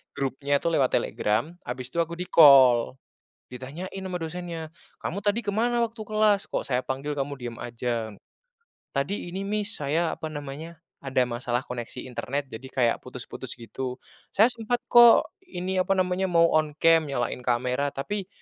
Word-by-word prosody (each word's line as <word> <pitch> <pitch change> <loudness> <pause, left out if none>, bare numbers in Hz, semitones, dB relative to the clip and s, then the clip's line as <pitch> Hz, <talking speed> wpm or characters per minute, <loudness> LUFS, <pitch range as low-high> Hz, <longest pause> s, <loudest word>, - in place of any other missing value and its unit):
grupnya 140 +1 0
lewat 150 -6 +2
Telegram, 110 +11 0
habis 125 0 -4
itu 170 - -2
aku 170 0 -4
di-call. 135 -8 +6 0.6
Ditanyain 155 +10 -7
sama 185 -1 -3
dosennya, 165 -1 -5 0.3
"Kamu 195 - -3
tadi 210 +2 0
kemana 235 +4 +1
waktu 230 0 -7
kelas? 215 -2 +2
kok - - -2
saya 125 -1 0
panggil 135 +3 -3
kamu 140 +1 -2
diem 120 -2 -7
aja?" 115 -2 -3 0.8
"Tadi 145 +7 -2
ini 195 - -3
Miss 210 +2 -2
saya, 160 +4 0
apa 160 - -6
namanya, 150 +3 -7 0.2
ada 130 -2 +1
masalah 120 +1 -2
koneksi 125 0 -6
internet, 135 +3 -3
jadi 125 +4 -8
kayak 120 -3 +2
putus-putus - - -8
gitu, 125 +2 -6 0.4
saya 220 +5 +6
sempat 240 +1 -2
kok, 240 -1 +7 0.2
ini, 185 - -2
apa 195 +1 +2
namanya, 185 0 +1
mau 170 -1 +4
on 155 -1 +1
cam, 165 0 +4
nyalain 125 -3 -2
kamera, 125 +3 0
tapi, 185 +8 -4
150 Hz, 155 wpm, -26 LUFS, 130-185 Hz, 0.8 s, kok